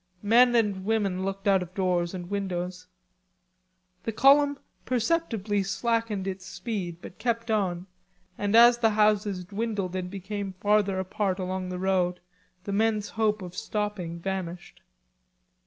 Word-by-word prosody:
Men 240 Hz, +3 st, +5 dB
and 205 Hz, -5 st, +1 dB
women 200 Hz, -3 st, 0 dB
looked 195 Hz, +1 st, -3 dB
out 195 Hz, -2 st, +4 dB
of 180 Hz, +1 st, -8 dB
doors 180 Hz, -2 st, 0 dB
and 175 Hz, -1 st, -6 dB
windows. 185 Hz, -2 st, -3 dB, 1.1 s
The 225 Hz, -, -3 dB
column 280 Hz, +4 st, +5 dB, 0.3 s
perceptibly 230 Hz, -, 0 dB
slackened 220 Hz, 0 st, -1 dB
its 190 Hz, -1 st, -4 dB
speed, 185 Hz, -3 st, -5 dB
but 185 Hz, -, -11 dB
kept 230 Hz, 0 st, -1 dB
on, 185 Hz, -4 st, 0 dB, 0.5 s
and 205 Hz, +1 st, 0 dB
as 240 Hz, +1 st, +8 dB
the 225 Hz, -2 st, +4 dB
houses 210 Hz, -3 st, +2 dB
dwindled 200 Hz, -2 st, -3 dB
and 180 Hz, -1 st, -3 dB
became 200 Hz, +1 st, -5 dB
farther 205 Hz, 0 st, +2 dB
apart 190 Hz, 0 st, -1 dB
along 185 Hz, -1 st, -3 dB
the 180 Hz, -, -4 dB
road 180 Hz, -1 st, +1 dB, 0.4 s
the 200 Hz, -, -4 dB
men's 215 Hz, 0 st, +1 dB
hope 215 Hz, -2 st, 0 dB
of 180 Hz, 0 st, -8 dB
stopping 205 Hz, -5 st, -3 dB
vanished. 180 Hz, -1 st, -5 dB
200 Hz, 140 wpm, -27 LUFS, 185-220 Hz, 1.1 s, as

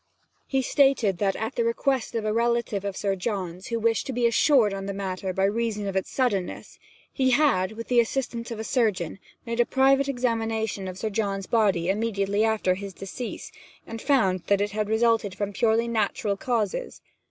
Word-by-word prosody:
He 265 Hz, -1 st, 0 dB
stated 255 Hz, -10 st, +3 dB
that, 195 Hz, -2 st, +1 dB
at 220 Hz, +4 st, -3 dB
the 235 Hz, -, 0 dB
request 235 Hz, +2 st, 0 dB
of 225 Hz, -2 st, -1 dB
a 215 Hz, -, 0 dB
relative 235 Hz, -3 st, 0 dB
of 200 Hz, -1 st, -4 dB
Sir 195 Hz, -1 st, 0 dB
John's, 185 Hz, -3 st, -4 dB
who 230 Hz, -1 st, -2 dB
wished 225 Hz, +3 st, +1 dB
to 265 Hz, -, -3 dB
be 245 Hz, 0 st, +1 dB
assured 235 Hz, -2 st, +4 dB
on 195 Hz, 0 st, -5 dB
the 200 Hz, -, -4 dB
matter 190 Hz, -1 st, -3 dB
by 190 Hz, +1 st, -1 dB
reason 210 Hz, 0 st, 0 dB
of 195 Hz, -, -3 dB
its 190 Hz, -, -1 dB
suddenness, 210 Hz, -9 st, -2 dB, 0.3 s
he 260 Hz, -1 st, +2 dB
had, 245 Hz, -8 st, +3 dB
with 230 Hz, +1 st, -7 dB
the 245 Hz, -1 st, +3 dB
assistance 235 Hz, 0 st, -1 dB
of 230 Hz, -, -5 dB
a -, -, -3 dB
surgeon, 210 Hz, -, 0 dB, 0.3 s
made 230 Hz, 0 st, -3 dB
a -, -, +7 dB
private 270 Hz, +2 st, +3 dB
examination 225 Hz, -5 st, -1 dB
of 185 Hz, 0 st, -6 dB
Sir 215 Hz, +2 st, -3 dB
John's 195 Hz, -2 st, -2 dB
body 195 Hz, -7 st, +2 dB
immediately 200 Hz, 0 st, 0 dB
after 220 Hz, -4 st, +2 dB
his 195 Hz, 0 st, -7 dB
decease, 210 Hz, +5 st, -6 dB, 0.3 s
and 225 Hz, 0 st, -7 dB
found 205 Hz, -10 st, +2 dB
that 200 Hz, -1 st, +3 dB
it 205 Hz, 0 st, 0 dB
had 210 Hz, 0 st, -2 dB
resulted 220 Hz, -3 st, +2 dB
from 205 Hz, +1 st, -3 dB
purely 230 Hz, +1 st, +2 dB
natural 215 Hz, -2 st, 0 dB
causes. 240 Hz, -, -2 dB
220 Hz, 190 wpm, -26 LUFS, 195-235 Hz, 0.3 s, a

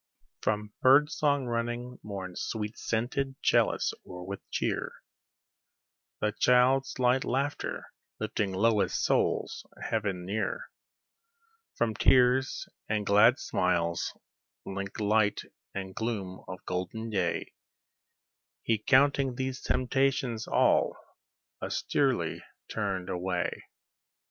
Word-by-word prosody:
From 105 Hz, 0 st, -1 dB
bird 145 Hz, +4 st, +6 dB
song 145 Hz, -4 st, +1 dB
running 120 Hz, +1 st, -3 dB
morn's 95 Hz, -4 st, -6 dB
sweet 105 Hz, -1 st, -3 dB
scented 130 Hz, +4 st, -2 dB
chalice -, -, +3 dB
o'er 90 Hz, -1 st, -9 dB
with 100 Hz, +2 st, -5 dB
cheer, -, -, -1 dB, 1.3 s
The 105 Hz, -, +2 dB
child's 125 Hz, +4 st, +3 dB
light 125 Hz, +1 st, +3 dB
laughter, 140 Hz, +3 st, -2 dB, 0.3 s
lifting 100 Hz, -2 st, -1 dB
lowliest 105 Hz, +2 st, +2 dB
souls -, -, +1 dB, 0.2 s
heaven 100 Hz, -5 st, -2 dB
near, 110 Hz, -, -3 dB, 1.0 s
From 115 Hz, -2 st, +1 dB
tears 130 Hz, +3 st, +3 dB, 0.2 s
and 105 Hz, -1 st, 0 dB
glad 105 Hz, +6 st, +6 dB
smiles, 85 Hz, -, 0 dB, 0.5 s
linked 100 Hz, +1 st, -5 dB
light 105 Hz, 0 st, +2 dB, 0.3 s
and 95 Hz, -1 st, -4 dB
gloom 100 Hz, -5 st, -4 dB
of 90 Hz, -, -6 dB
the -, -, -32 dB
golden 95 Hz, +5 st, -3 dB
day, 95 Hz, -4 st, -1 dB, 1.1 s
He 115 Hz, -2 st, +1 dB
counting 135 Hz, +2 st, +3 dB
these 130 Hz, +1 st, -3 dB
temptations 130 Hz, -3 st, 0 dB
all, -, -, +3 dB, 0.6 s
austerely -, -, 0 dB, 0.3 s
turned 95 Hz, -4 st, -2 dB
away. 90 Hz, -1 st, -1 dB
110 Hz, 100 wpm, -29 LUFS, 100-130 Hz, 1.3 s, bird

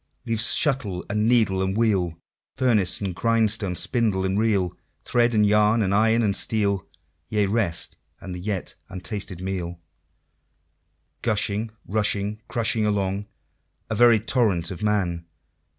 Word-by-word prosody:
Leaving 115 Hz, -2 st, -1 dB
shuttle, 115 Hz, -, +1 dB
and 105 Hz, +1 st, +1 dB
needle, 110 Hz, -6 st, +3 dB
and 95 Hz, +2 st, -1 dB
wheel, 95 Hz, -7 st, +1 dB, 0.4 s
Furnace, 110 Hz, -8 st, +3 dB
and 95 Hz, -2 st, -2 dB
grindstone, 110 Hz, -1 st, +1 dB
spindle, 105 Hz, -1 st, +1 dB
and 95 Hz, +2 st, 0 dB
reel, 100 Hz, -5 st, +1 dB, 0.3 s
Thread, 120 Hz, -1 st, +2 dB
and 105 Hz, -1 st, +4 dB
yarn, 105 Hz, +2 st, +3 dB
and 95 Hz, 0 st, 0 dB
iron, 110 Hz, +3 st, +3 dB
and 100 Hz, -2 st, +1 dB
steel 100 Hz, -5 st, 0 dB, 0.4 s
Yea, 105 Hz, -1 st, +1 dB
rest 100 Hz, -5 st, 0 dB, 0.2 s
and 95 Hz, -, -7 dB
the 90 Hz, -, -6 dB
yet 95 Hz, 0 st, -3 dB, 0.2 s
untasted 95 Hz, -1 st, -5 dB
meal 90 Hz, -2 st, -4 dB, 1.4 s
Gushing, 105 Hz, 0 st, 0 dB, 0.2 s
rushing, 105 Hz, 0 st, -1 dB
crushing 115 Hz, -1 st, +1 dB
along, 100 Hz, -1 st, -1 dB, 0.6 s
A -, -, 0 dB
very 120 Hz, 0 st, +6 dB
torrent 105 Hz, -7 st, 0 dB
of 95 Hz, -, -7 dB
Man! 90 Hz, -6 st, -1 dB
105 Hz, 135 wpm, -24 LUFS, 95-110 Hz, 1.4 s, very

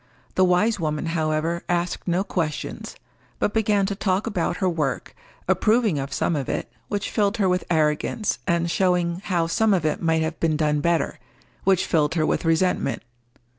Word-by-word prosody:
The 185 Hz, -, +3 dB
wise 185 Hz, +4 st, +3 dB
woman, 150 Hz, -1 st, -2 dB
however, 160 Hz, +1 st, 0 dB
asked 175 Hz, +1 st, -1 dB
no 180 Hz, +2 st, +1 dB
questions, 165 Hz, -6 st, -4 dB, 0.4 s
but 210 Hz, -, 0 dB
began 210 Hz, -3 st, +2 dB
to 200 Hz, -, -1 dB
talk 195 Hz, 0 st, 0 dB
about 180 Hz, -5 st, -1 dB
her 190 Hz, -, 0 dB
work, 155 Hz, -6 st, -2 dB, 0.3 s
approving 215 Hz, -8 st, +2 dB
of 135 Hz, 0 st, -4 dB
some 150 Hz, +4 st, 0 dB
of 140 Hz, -3 st, -3 dB
it, -, -, -3 dB, 0.2 s
which 205 Hz, -1 st, -3 dB
filled 205 Hz, 0 st, +1 dB
her 200 Hz, -3 st, +2 dB
with 180 Hz, -1 st, +1 dB
arrogance, 160 Hz, +7 st, 0 dB
and 170 Hz, 0 st, +1 dB
showing 180 Hz, -1 st, +1 dB
how 175 Hz, -3 st, +1 dB
some 205 Hz, +5 st, +2 dB
of 170 Hz, -4 st, -1 dB
it 155 Hz, -, 0 dB
might 160 Hz, -1 st, +2 dB
have 160 Hz, 0 st, -3 dB
been 160 Hz, -2 st, +1 dB
done 150 Hz, -1 st, +1 dB
better, 170 Hz, +1 st, 0 dB, 0.5 s
which 190 Hz, -2 st, +3 dB
filled 155 Hz, -1 st, +1 dB
her 155 Hz, -2 st, +2 dB
with -, -, 0 dB
resentment. 165 Hz, -5 st, +1 dB
170 Hz, 175 wpm, -24 LUFS, 160-195 Hz, 0.5 s, The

